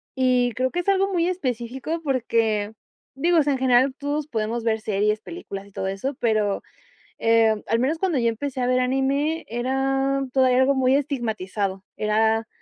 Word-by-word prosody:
Y 250 -2 +2
creo 255 +2 0
que 350 - -3
es 375 - -2
algo 390 0 +2
muy 340 -1 +2
específico 265 -1 -3
porque, 225 -6 0 0.4
digo, 335 +4 +3
sea, 290 -1 +1
en 265 - -2
general 260 +1 +4
todos 290 +1 -3
podemos 225 -2 -2
ver 220 -1 +1
series, 210 0 0
películas 200 - -8
y 200 - -18
todo 190 - -4
eso, 195 +9 -3
pero, 215 -4 +1 0.6
eh, 225 -2 +3
al 230 - +2
menos 295 +6 0
cuando 360 -7 0
yo 235 -1 +2
empecé 255 +3 -4
a 245 - +1
ver 255 0 +2
anime, 275 +5 0
era 270 +3 0
todavía 255 -2 +4
algo 260 +2 +4
muy 260 0 +3
estigmatizado, 210 -8 -2
era, 220 +1 +1
255 Hz, 170 wpm, -23 LUFS, 220-275 Hz, 0.6 s, general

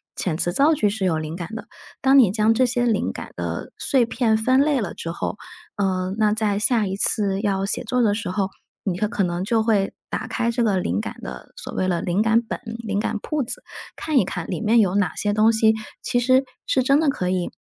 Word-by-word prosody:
遣 175 -4 -2
词 175 - 0
造 285 - +4
句 215 -9 +2
是 200 -1 -2
有 165 -4 +1
灵 155 +1 -5
感 175 +2 -7
的。 225 0 -7 0.3
当 270 +1 +5
你 225 -9 +6
将 215 +1 +3
这 255 +3 +4
些 245 0 0
灵 220 -3 +1
感 - - -9
的 - - -4
碎 260 -4 +3
片 230 -1 +1
分 255 +4 +3
类 290 -2 +2
了 195 - -4
之 165 - -5
后， 170 - -4 0.4
呃， 190 -2 -1
那 215 -1 +3
在 215 -2 0
下 215 0 +2
一 190 - -3
次 195 -1 +1
要 195 -2 0
写 210 - 0
作 250 +1 0
的 210 -3 +3
时 210 -4 -3
候， 195 -1 -1 0.3
你 180 -3 -2
会 210 - +1
可 210 - -2
能 175 -1 -1
就 225 +2 +1
会 215 -3 +1 0.2
打 - - -3
开 235 - -1
这 235 +1 0
个 200 -4 +2
灵 185 - -1
感 220 - -7
的 - - -9
所 - - -7
谓 185 - 0
的 175 -2 0
灵 180 +4 0
感 225 +1 +3
本 230 - -6 0.2
灵 205 -3 -2
感 215 0 -2
铺 305 -3 -1
子， 235 - -5 0.3
看 310 -3 -1
一 205 - +4
看 175 -3 -5
里 - - -3
面 225 +1 +4
有 195 -3 +2
哪 200 -5 +1
些 205 0 0
东 215 +2 +4
西 220 0 +3 0.3
其 245 - 0
实 260 +2 +3 0.2
是 260 - +2
真 275 +3 +3
的 315 -2 +2
可 180 -9 -1
以 180 -1 -1
215 Hz, 260 characters per minute, -22 LUFS, 190-240 Hz, 0.4 s, 你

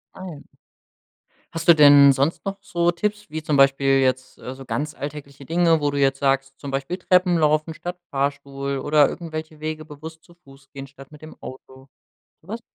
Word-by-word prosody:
Ah, 185 - -9
ja. 160 -5 -9 1.1
Hast 165 0 -6
du 170 - +9
denn 145 -2 +7
sonst 140 +8 -1
noch 195 0 -4
so 175 -2 0
Tipps 210 +4 -4
wie 160 +1 -5
zum 150 -2 0
Beispiel 135 0 +4
jetzt, 130 0 -1
äh, 125 - -8
so 135 0 -12
ganz 150 +4 -3
alltägliche 140 -1 -9
Dinge, 165 -1 +2
wo 145 - 0
du 145 - -4
jetzt 135 0 +1
sagst 135 0 0
zum 140 -2 -7
Beispiel 140 +7 -3
Treppen 180 -1 +2
laufen 155 +1 +1
statt 175 +2 -7
Fahrstuhl 140 0 -3
oder 145 0 +3
irgendwelche 155 -2 -7
Wege 155 0 -5
bewusst 155 +1 -11
zu 175 - -21
Fuß 135 -5 -20
gehen 135 0 -9
statt 135 +1 -16
mit 150 - -15
dem 155 - -12
Auto, 130 +1 -12 0.5
so 170 - -24
was? 225 +2 -5
150 Hz, 195 wpm, -22 LUFS, 135-165 Hz, 1.1 s, du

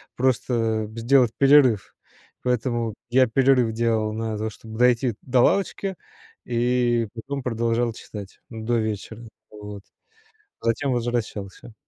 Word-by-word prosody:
просто 115 -4 0
сделать 120 0 +3
перерыв, 135 -7 +5 0.5
поэтому 120 -2 -1 0.2
я 130 +1 +4
перерыв 125 -1 +3
делал 110 -2 0
на 110 -1 -3
то, 110 +1 -2
чтоб 110 +2 -13
дойти 125 -2 +3
до 125 -1 +2
лавочки, 195 +2 +1 0.5
и 120 -1 +1
потом 135 +4 -5
продолжал 115 0 0
читать, 100 -3 -10
ну, 110 -2 -7
до 120 0 +1
вечера. 110 +1 -4 0.2
Вот. 105 -1 -9 0.8
Затем 115 +4 0
возвращался. 115 -3 -4
115 Hz, 115 wpm, -24 LUFS, 110-125 Hz, 0.8 s, перерыв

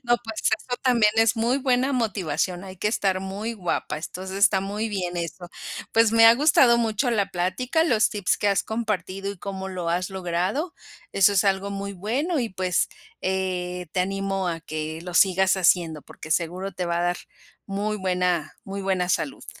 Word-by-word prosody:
No 240 0 +3
pues, 220 -1 -5
eso 225 +3 0
también 235 -5 +4
es 225 0 +4
muy 240 +4 +1
buena 260 0 +1
motivación. 185 - -1
Hay 190 0 -9
que 210 - 0
estar 190 -4 0
muy 200 +4 -4
guapa. 175 -5 -2
Entonces, 190 +4 -6
está 200 -1 +4
muy 205 +3 -3
bien 180 -4 -3
eso. 175 +1 -5 0.4
Pues, 225 -1 +4
me 225 0 +7
ha 230 - +9
gustado 255 -4 +5
mucho 230 +2 +1
la 205 -4 +1
plática, 220 - 0
los 220 -8 +3
tips 205 -3 0
que 205 - +1
has 200 - +2
compartido 200 -3 -3
y 200 - -9
cómo 190 0 -5
lo 180 -3 -4
has 180 +2 -1
logrado. 190 - -2 0.4
Eso 195 +1 +5
es 200 +1 +3
algo 195 0 +1
muy 200 0 -4
bueno 260 - -1
y 230 - -1
pues, 185 -1 0 0.3
eh, 180 -1 -2
te 185 - +1
animo 195 0 -1
a 165 -1 -3
que 155 0 -5
lo 180 -1 -7
sigas 190 0 +4
haciendo 170 -4 +2
porque 155 - -12
seguro 180 +4 -1
te 180 0 -3
va 170 0 0
a - - 0
dar 175 0 +1 0.5
muy 205 +2 -2
buena, 180 -4 0
muy 195 0 -5
buena 185 -2 0
salud. 265 +8 -3
195 Hz, 185 wpm, -24 LUFS, 180-220 Hz, 0.5 s, ha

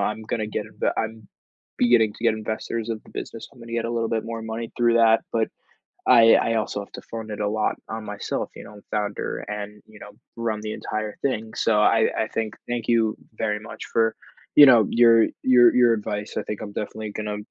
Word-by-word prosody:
I'm 105 +2 -1
gonna 110 0 -2
get 105 0 -4
it 110 - -2
I'm 110 -1 -4 0.5
beginning 120 -3 +4
to 115 - -9
get 115 - +4
investors 110 +1 -4
of 110 -1 -4
the - - -17
business. 115 - -7
I'm 130 - -18
gonna 115 0 -10
get 115 -1 -1
a 115 - -2
little 115 -1 -1
bit 110 -1 -1
more 115 0 -5
money 110 +1 -5
through 120 -1 +3
that, 115 -1 +5
but 110 -1 +1 0.6
I 115 -2 +7
I 115 - +2
also 105 -2 -2
have 100 - -12
to - - -8
fund 110 -1 -6
it 105 - -5
a 105 - 0
lot 110 +1 0
on 110 0 -5
myself, 105 -1 -4
you - - -9
know, 105 -1 -13
founder 105 -1 -2
and, 105 0 -6
you 110 -1 -16
know, 105 - -11 0.2
run 115 -2 -2
the 110 0 -4
entire 110 -1 -4
thing, 110 -5 -2
so 110 -2 +2
I 110 +1 +4
I 110 - 0
think 110 -1 -3
thank 120 -2 -3
you 115 -2 +2 0.2
very 105 -1 -1
much 110 - -9
for, 115 -1 +1 0.4
you 145 - +11
know, 120 -5 +7
your 115 -1 +5 0.2
your 125 -2 +6
your 120 -2 +5
advice. 105 -1 -4
I - - -1
think 105 - -5
I'm 105 - -7
definitely 110 0 -5
gonna 105 0 -4
110 Hz, 220 wpm, -24 LUFS, 105-115 Hz, 0.6 s, you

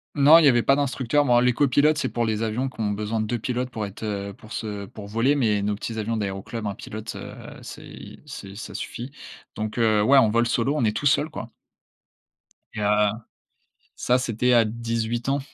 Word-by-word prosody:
Non, 150 +4 +8
il 160 - +4
y - - +8
avait 120 -3 +4
pas 135 - +4
d'instructeur. 140 0 +1
Bon, 120 -3 +4
les 125 0 +3
copilotes, 145 +3 +3
c'est - - -1
pour 120 -1 -1
les 110 -1 -1
avions 115 +4 -1
qui 130 - -7
ont 105 - 0
besoin 105 +2 -2
de 110 - -2
2 120 - -1
pilotes 125 +2 -2
pour 110 -4 -4
être, 100 +2 -10
heu, 100 -1 -3
pour 110 +3 -16
se 105 -2 -4
pour 105 - -10
voler, 115 +7 +2
mais 110 -7 +1
nos 105 +1 -1
petits 110 +2 -5
avions 115 +1 -2
d'aéroclub, 100 +2 -4
1 100 - -2
pilote, 110 +2 -8
heu, - - -8 0.3
c'est - - -10
c'est 100 0 -9
ça 115 - -8
suffit, 125 +4 -6 0.4
donc 110 +2 -4
heu, 110 -2 +3
ouais, 135 +6 +5
en 110 -5 +5
vol 115 +1 +2
solo, 120 +4 +1
on 150 - 0
est 110 -1 +1
tout - - -4
seul, 145 +2 +3
quoi. 115 -7 -8 1.2
Et 105 - -4
heu, 105 0 +3 0.9
ça 125 +1 +2
c'était 125 0 +1
à 115 -2 +5
18 115 +2 -2
ans. 140 - +1
115 Hz, 215 wpm, -24 LUFS, 105-125 Hz, 1.2 s, Non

